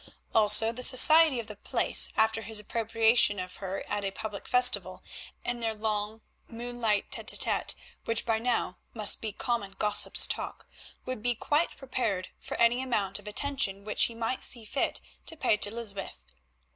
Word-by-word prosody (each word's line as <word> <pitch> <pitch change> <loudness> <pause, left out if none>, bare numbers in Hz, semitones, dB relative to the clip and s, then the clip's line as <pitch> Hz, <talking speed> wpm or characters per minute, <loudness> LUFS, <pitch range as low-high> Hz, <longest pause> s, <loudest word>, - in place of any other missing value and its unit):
Also, 220 +1 +5
the 240 +2 -8
society 310 +2 +7
of 230 - -6
the 210 -1 -11
place, - - +3
after 220 0 +1
his 220 0 0
appropriation 225 0 +1
of 180 0 -8
her 195 0 -6
at 205 0 -4
a 195 - -2
public 205 +1 -8
festival 200 -7 +4 0.4
and 240 0 -3
their 225 -1 -3
long 215 0 -4 0.3
moonlight 235 -3 -3
tête - - 0
à - - 0
tête, - - 0 0.3
which 230 -1 -2
by 225 -2 -1
now 230 -6 -2 0.2
must 215 -3 +1
be 220 - -5
common 210 -2 -4
gossip's 210 -1 +3
talk, - - -6 0.4
would 255 -4 -6
be 245 +1 -1
quite 295 +8 -2
prepared 245 -8 -4
for - - -8
any 240 +2 +2
amount 205 -7 -3
of 205 - -16
attention 210 -4 -3
which 210 - 0
he 230 - -7
might 230 +3 -4
see 235 -3 -1
fit 265 +6 -3 0.3
to 325 - -9
pay 250 -6 +1
to 210 - 0
Lysbeth. 210 -3 -5
225 Hz, 170 wpm, -27 LUFS, 205-245 Hz, 0.4 s, society